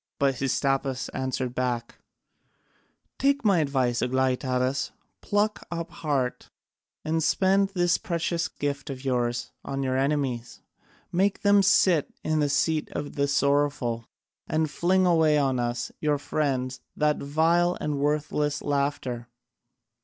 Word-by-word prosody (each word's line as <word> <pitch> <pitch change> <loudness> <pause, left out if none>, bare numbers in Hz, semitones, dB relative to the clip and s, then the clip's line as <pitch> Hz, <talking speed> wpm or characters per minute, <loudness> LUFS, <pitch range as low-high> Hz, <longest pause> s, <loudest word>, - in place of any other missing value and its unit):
But 140 -1 +2
Hystaspas 135 0 0
answered 130 -1 -2
back: 125 -2 -2 1.2
"Take 280 -2 +2
my 195 -5 +4
advice, 130 -5 +1
Aglaïtadas, 130 +1 0 0.3
pluck 210 +1 0
up 170 -1 -4
heart 140 -5 -2 0.6
and 160 +1 0
spend 195 +4 +3
this 175 -1 +2
precious 170 0 -1
gift 145 0 -4
of 135 0 -7
yours 120 -2 -1
on 135 0 -3
your 130 -1 0
enemies: 135 -4 -1 0.5
make 195 +3 +1
them 200 0 +5
sit 185 -4 +3
in 155 0 +1
the 145 -1 +2
seat 155 +2 +1
of 145 - -4
the 140 0 0
sorrowful, 140 -5 +1 0.4
and 155 -1 0
fling 185 +4 +2
away 160 -3 +4
on 135 -3 +1
us, 120 0 -2
your 150 -1 +1
friends, 130 -3 -2
that 150 0 +1
vile 165 +5 +2
and 150 -2 -2
worthless 150 0 0
laughter. 140 -4 -1
145 Hz, 125 wpm, -26 LUFS, 130-160 Hz, 1.2 s, them